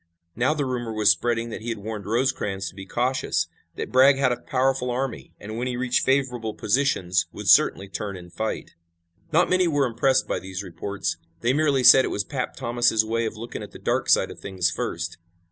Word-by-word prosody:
Now 130 +6 +1
the 145 -2 -1
rumor 120 -3 -3
was 110 -1 +4
spreading 115 -1 -1
that - - -6
he 120 - -5
had 115 - -2
warned 105 -1 -6
Rosecrans 105 -5 -1
to - - -17
be 95 0 -9
cautious, 120 -9 0 0.3
that - - -5
Bragg 130 +2 +6
had 135 -2 +2
a 120 0 -3
powerful 130 -1 0
army 125 0 -4
and 110 +2 -7
when 125 - -2
he 125 -1 -3
reached 125 0 +1
favorable 125 -5 0
positions, 105 -8 +1
would - - -8
certainly 100 - +5
turn 100 0 -5
and 90 -1 -13
fight. 110 +3 -4 0.6
Not 170 +3 +4
many 185 -1 +3
were 145 -4 +2
impressed 130 +2 +1
by - - -1
these 95 0 -6
reports. 90 -1 -4 0.2
They 120 +2 +2
merely 145 -3 +2
said 130 +2 +9
it - - -1
was 100 - -1
"Pap" 125 +4 -4
Thomas' 120 -2 +2
way 115 +1 -1
of 110 - -7
looking 115 +2 -7
at - - -9
the - - -9
dark - - -1
side - - +4
of - - -11
things 90 -2 -1
first. 85 -1 -4
115 Hz, 210 wpm, -24 LUFS, 100-130 Hz, 0.6 s, said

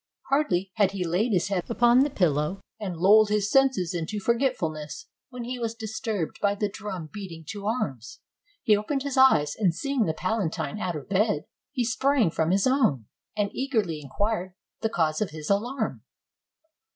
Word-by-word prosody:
Hardly 195 -10 +1
had 200 -2 +3
he 185 -2 -2
laid 185 +8 +1
his 185 -1 +1
head 190 -3 -2
upon 240 +1 +4
the 280 +2 +4
pillow, 165 - 0 0.2
and 190 -5 -4
"lulled 205 +5 +6
his 210 0 +1
senses 260 -10 +3
in 165 -2 -2
forgetfulness," 195 - -1 0.2
when 250 -2 -7
he 250 +1 -4
was 230 -1 -2
disturbed 220 -5 -4
by 205 0 +2
the 210 +1 0
drum 190 -6 -6
beating 175 -6 -8
to 205 -1 -5
arms. 135 - -3 0.4
He 215 - +5
opened 270 +7 -2
his 280 -2 -3
eyes, 205 - +5
and 185 -6 +1
seeing 275 0 0
the 160 - -1
palatine 195 +1 -2
out 180 -4 -2
of 150 - -7
bed, 195 -5 +1 0.3
he 250 -3 -1
sprang 245 - +2
from 160 0 0
his 190 +2 +2
own, 230 - +2 0.3
and 205 -1 0
eagerly 215 - -1
inquired 185 +5 -2 0.2
the 220 - 0
cause 160 -5 0
of 215 - 0
his 155 +2 -5
alarm. 220 - -1
205 Hz, 175 wpm, -26 LUFS, 170-235 Hz, 0.4 s, lulled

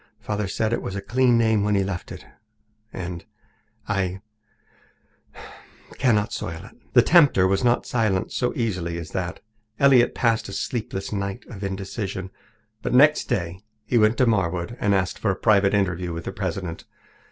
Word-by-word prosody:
Father 105 -1 -3
said 110 +4 -1
it - - -1
was 95 - -5
a - - -2
clean 120 +3 +2
name 110 -3 +2
when 105 0 +1
he 100 - +2
left 95 -2 -5
it, - - -9 0.7
and 90 -2 -6 0.6
I 95 -1 -1 1.8
cannot 110 -5 +2
soil 80 -1 -5
it." - - -15 0.2
The - - +7
tempter 145 - +5
was 95 +4 +1
not 120 0 +2
silenced 110 -6 0
so 125 - 0
easily 90 -8 -2
as 85 -2 -7
that. 95 -2 -4 0.4
Elliott 135 -3 +5
passed 115 -4 +1
a - - -7
sleepless 100 -5 -4
night 100 +3 -3
of 100 -3 -8
indecision. 95 0 -4 0.5
But - - -1
next 150 +4 +5
day 90 -7 -2 0.3
he 120 +2 +2
went 110 +2 +3
to 130 - +4
Marwood 95 -2 0
and 100 -1 +2
asked 90 -1 -1
for 105 - 0
a 95 - +1
private 100 -1 +3
interview 90 -3 -1
with 85 0 -5
the - - -4
president. 90 -3 -4
100 Hz, 165 wpm, -24 LUFS, 95-115 Hz, 1.8 s, The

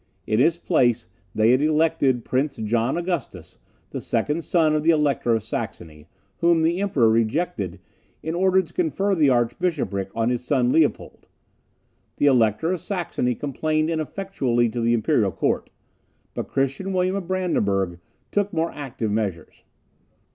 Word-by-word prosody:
In 110 +1 +1
his 165 +6 +3
place 120 -10 +1 0.3
they 110 +2 +4
had 130 +2 +3
elected 150 -5 +2
Prince 135 +2 0
John 115 +5 0
Augustus, 165 - -4 0.3
the - - -5
second 155 +3 -1
son 160 -3 +2
of 155 - +1
the 160 - +1
Elector 145 -7 +2
of 110 - -2
Saxony, 80 -7 -6 0.3
whom 170 -1 +3
the 170 +4 +1
Emperor 150 - +2
rejected, 115 - 0 0.4
in 160 - -3
order 190 +1 +3
to 170 0 -17
confer 185 +4 0
the 155 -6 +3
archbishopric 120 - 0
on 115 +1 +1
his 125 0 -2
son 125 0 +1
Leopold. 160 0 0 0.9
The - - +1
Elector 125 - +3
of 185 - -3
Saxony 170 - -2
complained 155 +4 -1
ineffectually 155 -8 -1
to 120 +1 -3
the 115 +1 +2
imperial 110 - +1
court; - - -1 0.6
but - - -4
Christian 135 +8 -1
William 185 +1 +1
of 195 -4 -4
Brandenburg 100 - 0 0.3
took 205 0 0
more 165 -1 -1
active 120 -6 -4
measures. 100 -6 -3
140 Hz, 145 wpm, -23 LUFS, 115-170 Hz, 0.9 s, they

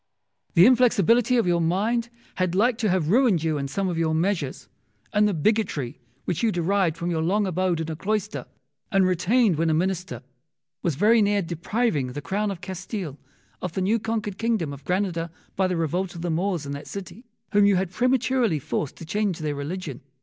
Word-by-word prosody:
Wolsey. - - -49
The 175 +1 +8
inflexibility 245 0 +4
of 230 - +2
your 175 -1 +2
mind 215 +8 0 0.3
had 185 -1 0
like 235 +4 +2
to 220 -4 +1
have 180 -4 +1
ruined 220 - +3
you 155 -2 0
in 140 - -2
some 190 +8 -2
of 170 -2 -2
your 160 -1 +1
measures; 165 -5 -1 0.5
and 210 0 +4
the 205 - 0
bigotry 155 - 0 0.3
which 175 - -1
you 230 - +3
had 215 - 0
derived 175 -1 +1
from 170 +1 -2
your 160 -1 0
long 200 +6 +1
abode 185 -2 0
in 160 0 -3
a - - -4
cloister, 190 -6 -2 0.4
and 195 -2 +4
retained 185 +2 +2
when 165 0 +2
a 155 - +2
Minister, 180 -1 -2 0.6
was 170 -6 0
very 215 - +4
near 205 -1 +2
depriving 170 - -1
the 145 - -4
Crown 205 +4 -1
of 190 -3 -5
Castile 185 - -5 0.4
of 180 -2 -4
the 190 - -2
new 215 +5 +2
conquered 215 -3 -3
kingdom 220 -11 0
of 140 - -11
Granada 180 -3 -1 0.3
by 190 -1 +2
the 180 -2 -1
revolt 175 +3 -1
of 170 - -6
the 175 - -1
Moors 175 -1 -1
in 140 - -5
that 140 +1 -6
city, 195 +3 -8 0.3
whom 205 0 +5
you 200 - +4
had 185 -1 -1
prematurely 250 -4 +2
forced 150 0 -3
to 165 - -10
change 205 0 -1
their 155 -2 -2
religion. 145 -1 -5
185 Hz, 205 wpm, -25 LUFS, 165-210 Hz, 0.6 s, The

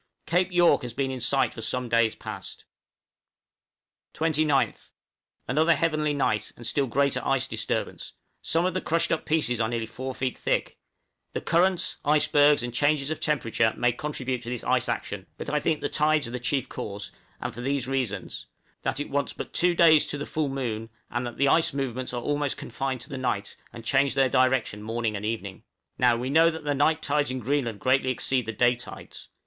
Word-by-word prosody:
Cape 180 +2 +1
York 175 -3 +4
has 120 -2 -7
been 135 -1 -1
in 130 -1 -5
sight 135 +3 +2
for 115 - -8
some 125 +3 -2
days 115 -1 +2
past. - - -8 1.5
29th. 155 -3 +1 0.6
Another 160 +6 +3
heavenly 155 -2 +1
night, 135 -7 0
and 120 - -10
still 135 +4 +1
greater 140 +3 +1
ice - - +1
disturbance; - - -3 0.3
some 165 +2 +1
of 185 - 0
the 185 - -1
crushed 165 +1 +1
up 165 - -1
pieces 150 -7 +1
are 110 -1 +1
nearly 115 -2 -2
four 130 +3 -6
feet 130 -1 -2
thick. - - -1 0.5
The - - -1
currents, 175 +2 +1
icebergs, 145 -1 +4
and 120 -1 -4
changes 145 +2 +1
of 155 - -3
temperature, 115 -7 +1
may 125 0 +3
contribute 130 -1 -3
to 120 - -7
this 125 -2 -4
ice - - +1
action; - - -4
but - - -5
I 150 - +2
think 155 +1 0
the - - 0
tides 150 -2 +2
are - - -7
the 125 - -3
chief 130 +2 -1
cause, 100 0 -6 0.3
and - - -4
for 120 - -7
these 135 0 -1
reasons: 125 -8 -3 0.3
that 135 - -2
it 145 - -4
wants 140 0 -1
but - - -7
two 175 0 +2
days 160 -3 +6
to 145 - -2
the 145 - -4
full 155 -2 -1
moon, 115 -5 -3 0.2
and 120 0 -2
that 120 - -8
the 140 - +3
ice 160 +2 +3
movements 130 -2 -2
are 120 -1 -4
almost 145 -1 -1
confined 130 +1 -4
to 135 - -8
the 135 -3 -5
night, 105 -5 -2 0.2
and 115 -1 -10
change 140 +2 +2
their 135 -1 +4
direction 130 -5 +2
morning 115 0 -2
and 105 +1 -4
evening. 100 -4 -4 0.4
Now 120 -2 +4
we 125 +3 -3
know 165 +3 +6
that 160 -1 -6
the 145 -1 0
night 155 +3 +2
tides 145 0 +1
in 130 - -2
Greenland 125 -3 -1
greatly 130 +3 +2
exceed 130 -1 0
the - - -1
day 120 +3 +3
tides. 120 - -10
135 Hz, 200 wpm, -26 LUFS, 120-150 Hz, 1.5 s, days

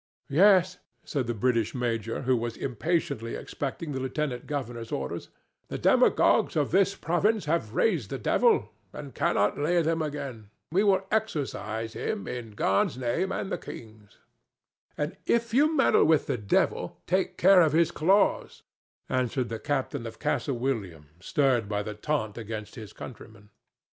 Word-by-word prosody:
"Yes," 185 +2 +5 0.3
said 135 -6 -2
the 120 - -2
British 115 0 0
major, 115 -1 -2
who 130 0 +3
was 120 -1 -3
impatiently 135 -3 -2
expecting 145 +3 -5
the 135 - -3
lieutenant 130 -1 -3
governor's 120 -6 -4
orders. 65 -1 -4 0.4
"The - - -4
demagogues - - +3
of 150 -3 +1
this 195 0 +3
province 195 +5 +1
have 150 -8 -1
raised 165 - +1
the - - -3
devil, - - +2 0.2
and - - -8
cannot 105 +6 +1
lay 155 +5 +1
him 165 0 +1
again. 140 -8 -5 0.2
We 190 +5 +3
will 195 -2 +3
exorcise 130 - -2
him 215 -2 -3
in 115 -3 -6
God's 100 +3 +1
name 130 +10 -1
and 195 - -3
the - - -2
king's." 110 -2 -11 1.1
"If 235 -1 +1
you 305 +5 +3
meddle - - +5
with 155 -1 +3
the 135 - -1
devil, 100 -1 0
take 185 +1 0
care 190 0 +7
of 155 -3 +3
his 165 +1 +3
claws," 190 +7 +1 0.4
answered 130 -1 -1
the 115 -1 -4
captain 140 -3 -2
of 115 - -9
Castle 135 -4 -1
William, 100 - -3
stirred 120 +1 +1
by 105 -1 -1
the 105 0 -5
taunt 110 -1 -2
against 110 -1 -6
his 110 -4 -9
countrymen. 110 -3 -11
130 Hz, 155 wpm, -27 LUFS, 115-165 Hz, 1.1 s, care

